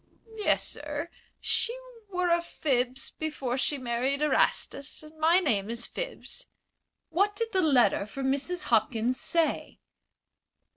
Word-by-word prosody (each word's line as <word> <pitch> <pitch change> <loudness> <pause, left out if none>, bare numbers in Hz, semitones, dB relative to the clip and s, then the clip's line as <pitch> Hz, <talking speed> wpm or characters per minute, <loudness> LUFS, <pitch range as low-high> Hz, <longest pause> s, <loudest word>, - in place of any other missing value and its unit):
"Yes, 425 - +2
sir. 295 +2 -4 0.3
She 475 +2 +2 0.3
were 360 -2 0
a 340 0 +4
Phibbs 260 -6 -1
before 290 -6 -2
she 280 +2 0
married 255 +3 -1
Erastus, 300 -1 +1
and 305 +1 -14
my 325 +3 +5
name 225 - +1
is 235 +1 -1
Phibbs." - - -6 0.6
"What 400 +5 +2
did 455 +2 -1
the 375 - +3
letter 245 - +4
from 265 +5 -1
Mrs. 320 +7 -1
Hopkins 230 +2 +1
say?" 335 -2 0
290 Hz, 130 wpm, -28 LUFS, 250-340 Hz, 0.6 s, my